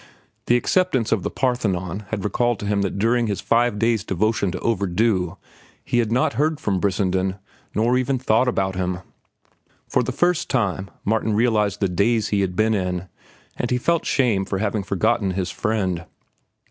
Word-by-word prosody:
The 120 - +5
acceptance 130 - +1
of 110 - +2
The - - -2
Parthenon 105 -7 -1
had 105 -2 -3
recalled 120 +3 +1
to - - -4
him 100 0 +1
that 100 0 -2
during 115 +3 +2
his 100 -2 -2
five 120 -2 +2
days' 115 -1 +1
devotion 105 +1 0
to 90 - -4
"Overdue" 95 -3 0 0.5
he 120 - +1
had 115 -2 0
not 140 +5 +2
heard 155 +1 0
from 100 -10 0
Brissenden 95 -1 0 0.4
nor 120 +4 +2
even 130 +1 0
thought 125 0 +2
about 95 -6 0
him. 90 -1 -2 0.9
For - - +2
the - - -2
first 175 -2 +1
time 100 - 0 0.2
Martin 110 +1 +1
realized 105 -3 +1
the 100 - +3
daze 105 +5 +1
he 100 -1 +1
had 90 -2 -1
been 110 +3 +2
in, 90 -2 -2 0.5
and 120 - -2
he 125 - +2
felt 170 +6 +1
shame 120 -8 +2
for 95 - -3
having 105 +1 -1
forgotten 100 +1 0
his 95 -2 -1
friend. 95 -6 -1
105 Hz, 175 wpm, -22 LUFS, 95-120 Hz, 0.9 s, The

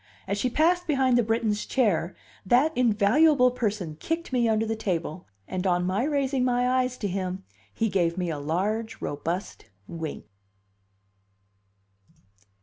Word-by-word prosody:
As 200 +1 -1
she 255 - +1
passed 345 +7 +2
behind 265 -4 +2
the 240 - +5
Briton's 225 -2 0
chair, 200 -9 0 0.3
that 255 +10 +3
invaluable 250 +4 +4
person 205 -10 -3
kicked 330 -3 -3
me 240 -2 +2
under 220 0 +1
the 225 0 -2
table, 180 -5 -3 0.2
and 185 +1 -2
on 180 -1 +1
my 190 +5 0
raising 275 -3 0
my 245 0 +2
eyes 255 0 +1
to 205 - -2
him 185 0 -3 0.3
he 225 - -1
gave 175 -4 0
me 180 -2 -1
a 150 - -4
large, 200 +9 -2
robust 165 - -4 0.2
wink. 160 -3 -6
220 Hz, 145 wpm, -26 LUFS, 185-250 Hz, 0.3 s, the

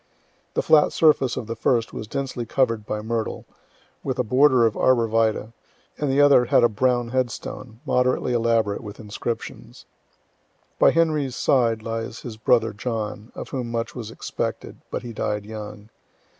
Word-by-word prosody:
The - - +1
flat 150 -2 +5
surface 150 -6 +3
of - - -3
the 115 +1 -5
first 115 0 0
was 110 - -6
densely 130 0 -3
cover'd 115 -3 0
by 105 0 -3
myrtle, 115 0 -3 0.6
with 130 - -2
a 125 - +1
border 130 +1 +4
of 110 - +1
arbor 125 -3 +3
vitae, 110 0 0 0.4
and 145 - -2
the 135 - +2
other 145 -4 +6
had 120 - +4
a 120 - +5
brown 120 +2 +1
headstone, 125 -1 -4
moderately 125 0 +1
elaborate, 115 -3 +1
with 105 -3 -9
inscriptions. 110 +2 -6 0.9
By - - +7
Henry's 155 -6 +1
side 115 -3 +2
lies 115 0 -4
his 120 -3 -7
brother 115 0 +2
John, 110 0 -4
of - - -7
whom 125 -3 -4
much 115 0 -3
was 115 -4 -6
expected, 115 - -5
but - - -4
he 120 -1 -7
died 105 -1 -2
young. 105 -1 -8
115 Hz, 160 wpm, -23 LUFS, 110-130 Hz, 0.9 s, By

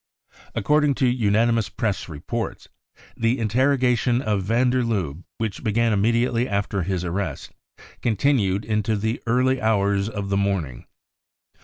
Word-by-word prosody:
According 150 +6 +2
to 130 - +1
unanimous 115 -1 +2
Press 105 -6 -2
reports, 90 +10 -5 0.5
the 115 +3 +1
interrogation 125 +1 +2
of 105 -6 0
van 120 +6 +2
der 130 0 +1
Lubbe, 90 - -2
which 110 -3 -4
began 115 +1 +2
immediately 115 +4 +1
after 100 -1 -1
his 90 0 -2
arrest, 85 -4 -4 0.5
continued 110 -4 +1
into 110 0 0
the 110 +3 -2
early 130 +3 +2
hours 100 -2 +1
of 100 -3 -5
the 100 - +1
morning. 90 -11 -2
110 Hz, 130 wpm, -23 LUFS, 100-120 Hz, 0.5 s, According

